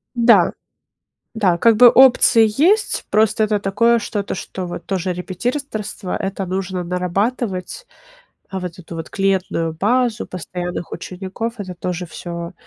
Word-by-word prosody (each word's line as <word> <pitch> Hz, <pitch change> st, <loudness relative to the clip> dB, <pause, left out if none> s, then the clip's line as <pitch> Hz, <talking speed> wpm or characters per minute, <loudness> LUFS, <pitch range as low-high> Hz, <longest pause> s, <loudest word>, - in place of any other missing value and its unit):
Да, 230 Hz, -7 st, +5 dB, 0.8 s
да, 190 Hz, -6 st, +2 dB
как 230 Hz, +4 st, +4 dB
бы 245 Hz, +2 st, +9 dB
опции 245 Hz, -2 st, +6 dB, 0.2 s
есть, 410 Hz, +5 st, +2 dB
просто 215 Hz, +1 st, +3 dB
это 210 Hz, -1 st, 0 dB
такое 230 Hz, +5 st, +2 dB
что-то, 205 Hz, -2 st, -3 dB
что 185 Hz, -1 st, -6 dB
вот 175 Hz, -, -7 dB
тоже 185 Hz, -1 st, -1 dB
репетиторство- 210 Hz, +2 st, -4 dB
это 195 Hz, 0 st, -3 dB
нужно 185 Hz, 0 st, -3 dB
нарабатывать, 185 Hz, -, -2 dB, 0.6 s
а 190 Hz, -, -4 dB
вот 180 Hz, 0 st, -6 dB
эту 170 Hz, -1 st, -9 dB
вот 165 Hz, -1 st, -7 dB
клиентскую 190 Hz, -4 st, 0 dB
базу 235 Hz, +5 st, +1 dB
постоянных 175 Hz, -1 st, -6 dB
учеников- 190 Hz, +5 st, -5 dB
это 185 Hz, -3 st, -6 dB
тоже 180 Hz, 0 st, -4 dB
всё, 170 Hz, 0 st, -7 dB
195 Hz, 135 wpm, -19 LUFS, 180-225 Hz, 0.8 s, бы